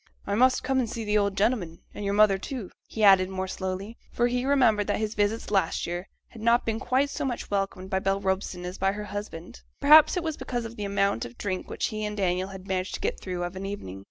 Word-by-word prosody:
'I 200 - -2
must 255 +4 +3
come 265 0 +1
and 240 -3 0
see 230 0 -4
the 210 0 +2
old 200 -1 0
gentleman; 195 -6 0 0.2
and 205 - -6
your 200 0 0
mother, 205 -2 +5
too,' 235 -2 -6 0.2
he 220 - -3
added 190 -2 +6
more 190 0 -3
slowly, 190 +4 -5
for 240 - +1
he 245 +1 0
remembered 225 -7 +3
that - - +1
his 215 0 -2
visits 210 +1 -1
last 190 -5 +1
year 175 +3 -5 0.2
had 225 - -12
not 235 +2 +3
been 225 -1 -1
quite 265 +3 +1
so - - -3
much 250 -6 -3
welcomed 195 -1 -2
by 190 - +2
Bell 195 +1 0
Robson 190 -2 -2
as 180 +1 -6
by 195 +1 +2
her 210 +1 -5
husband; 205 -1 -7 0.2
perhaps 305 +5 +7
it 355 - -1
was 315 -2 -3
because 245 -3 -3
of 225 0 -8
the 210 - -4
amount 200 - +1
of 120 0 -9
drink 185 -2 -3
which - - -2
he 215 0 -4
and 210 0 -3
Daniel 185 -1 0 0.2
managed 185 0 -2
to - - -6
get - - -2
through 180 -2 -4
of 175 +1 -4
an 195 +1 -5
evening. 95 - -6
205 Hz, 245 wpm, -27 LUFS, 190-230 Hz, 0.2 s, perhaps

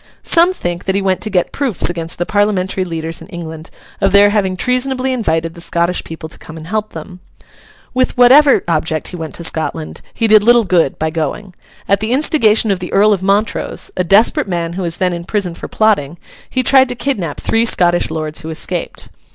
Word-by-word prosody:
Some 340 +1 +4
think 175 - -5
that 190 - 0
he 200 - +1
went 190 -1 0
to 215 - -3
get 180 -4 0
proofs 265 -9 -1
against 165 -1 -5
the 175 - -2
Parliamentary 200 -2 0
leaders 165 -2 -5
in - - -11
England 160 -2 -8 0.3
of 195 -1 +2
their 200 +1 +5
having 190 -3 0
treasonably 255 +3 0
invited 165 -8 -1
the 170 - -12
Scottish 170 +1 0
people 160 0 -8
to 155 - -9
come 160 - -11
and 155 - -9
help 215 +4 -3
them. 180 -2 -9 0.7
With 255 0 0
whatever 270 +4 +6
object 160 -1 -1
he - - -7
went 160 -2 -6
to 170 - -5
Scotland, 160 -1 -4
he 230 - -2
did 215 -1 +6
little 235 +1 +4
good 170 -7 +1
by 160 0 -2
going. 165 +5 -4 0.3
At 200 0 +2
the 220 +3 -1
instigation 230 -7 +3
of 190 - -1
the 180 - -6
Earl 210 +2 +4
of 190 - -2
Montrose, 200 +3 0
a 185 - 0
desperate 200 +4 +3
man 170 -2 -3
who 190 - -4
was 170 -2 -2
then 185 -2 0
in 170 0 -5
prison 190 -2 -2
for - - -8
plotting, 185 -8 0 0.3
he 255 - -1
tried 265 0 +4
to 245 - -4
kidnap 200 - -3
three 225 +1 +1
Scottish 175 -6 +2
lords 155 -1 -4
who 160 - -7
escaped. 165 +2 -4
185 Hz, 210 wpm, -15 LUFS, 165-220 Hz, 0.7 s, whatever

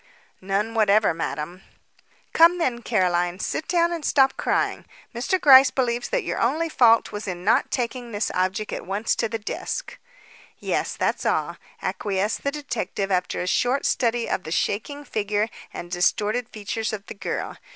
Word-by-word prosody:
"None 200 +4 -1
whatever, 215 -3 +3
Madam." 165 +2 -4 0.7
"Come, 335 +2 +6
then. 250 -8 -1
Caroline, 180 -5 +1
sit 310 - -3
down 340 -1 +2
and 335 -3 -4
stop 270 -2 +3
crying. - - -1 0.3
Mr. 265 +11 0
Gryce 270 -3 +8
believes 245 -2 -1
that - - 0
your - - -3
only 315 +8 +1
fault 230 -6 +4
was 205 0 -6
in 180 -1 -5
not 215 - +3
taking 245 -1 -3
this 205 0 -1
object 190 +4 -1
at - - -4
once 205 +3 0
to 225 - 0
the 225 - -2
desk." 225 - -5 0.6
"Yes, - - -2
that's - - 0
all," - - 0 0.3
acquiesced 205 +1 -1
the 280 - +1
detective 245 -8 -3
after 180 -1 0
a - - -2
short 250 +7 +1
study 235 -1 +1
of - - -1
the 160 - -8
shaking 285 - -2
figure 210 -1 -1 0.2
and 175 - -8
distorted 210 +6 0
features 215 +1 -4
of 205 -1 -5
the - - -8
girl. 200 - -4
220 Hz, 165 wpm, -24 LUFS, 195-255 Hz, 0.7 s, Gryce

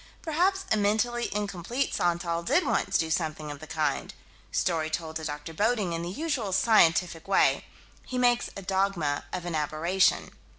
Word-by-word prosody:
Perhaps 365 +4 +1
a 220 - +4
mentally 220 +4 +1
incomplete 205 +5 -2
Santal 170 -1 0
did 285 - +2
once - - +1
do 160 -1 -1
something 155 -2 -2
of 145 - -8
the 155 - -10
kind. 150 -3 -2 0.4
Story 160 -3 0
told 160 0 -3
to 160 - -8
Dr. 150 +1 -5
Bodding: 210 -1 +1
in 165 - -2
the 170 - -4
usual 255 - -2
scientific 175 -5 +3
way, 195 - +3 0.4
he 255 - -5
makes 245 -1 +2
a 195 - -7
dogma 190 -7 0
of 180 -1 -4
an 175 - -3
aberration. 155 +5 +1
180 Hz, 165 wpm, -28 LUFS, 160-220 Hz, 0.4 s, a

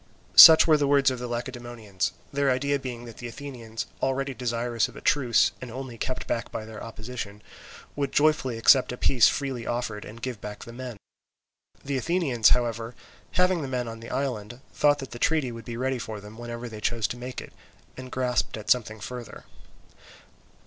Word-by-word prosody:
Such 160 -1 +11
were 155 -2 +5
the 145 -1 +1
words 140 -1 +4
of 130 - -4
the 125 - -4
Lacedaemonians, 120 -6 -4 0.2
their 140 0 +2
idea 140 +2 +1
being 120 -3 -6
that 115 -2 -11
the 120 - -6
Athenians, 120 -3 -7 0.2
already 135 +1 0
desirous 120 -2 -1
of - - -15
a - - -8
truce 125 -6 +3
and 125 - -7
only 130 0 -7
kept 130 +2 -4
back 115 - -3
by 110 -1 -5
their 110 -1 -9
opposition, 110 -2 -7 0.5
would 140 -2 -2
joyfully 145 -5 +2
accept 125 +3 +5
a 125 - -5
peace 125 -2 +5
freely 130 -5 -3
offered, 120 -3 -3
and 115 +2 -11
give 125 -5 -4
back 105 0 -7
the 115 - -10
men. 125 -2 -7 0.9
The 140 -1 -1
Athenians, 135 -6 +2
however, 115 -1 0 0.4
having 180 -1 +3
the 140 - -4
men 125 -2 -2
on 115 0 -7
the 115 - -10
island, 120 -4 -3
thought 145 -1 +3
that 135 -2 -8
the 120 - -8
treaty 155 -5 +1
would 115 0 -9
be 115 -1 -6
ready 130 0 -1
for 110 -2 -6
them 105 +2 -12
whenever 120 +1 -6
they 110 -2 -9
chose 115 0 0
to - - -4
make 125 +1 -6
it, - - -11 0.4
and 130 0 -9
grasped 125 -3 -1
at 105 - -2
something 110 -3 +1
further. 120 +2 -8
120 Hz, 190 wpm, -26 LUFS, 115-135 Hz, 0.9 s, Such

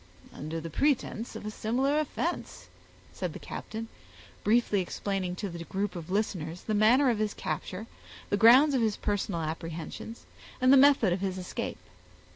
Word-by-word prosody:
"Under 155 +3 -5
the 165 0 -7
pretense 255 - 0
of - - -7
a 215 - -3
similar 260 +8 +1
offense," 315 +3 -3 0.4
said - - -4
the - - -6
captain, 225 +1 -6 0.6
briefly 215 -2 +3
explaining 185 0 -3
to 200 +2 -4
the 170 -2 -6
group 195 +2 -3
of 170 -1 -7
listeners 180 -4 -2
the 215 - -2
manner 240 +6 +5
of 220 - -2
his 215 -1 -1
capture, 190 +4 -4 0.5
the - - +4
grounds 250 +8 +7
of 260 - +2
his 220 -2 +1
personal 200 -4 -1
apprehensions, 165 +7 -6 0.3
and 255 +1 +5
the - - +9
method 270 -8 +6
of 185 - -3
his 190 -1 -2
escape. 180 -1 -4
210 Hz, 165 wpm, -29 LUFS, 180-240 Hz, 0.6 s, the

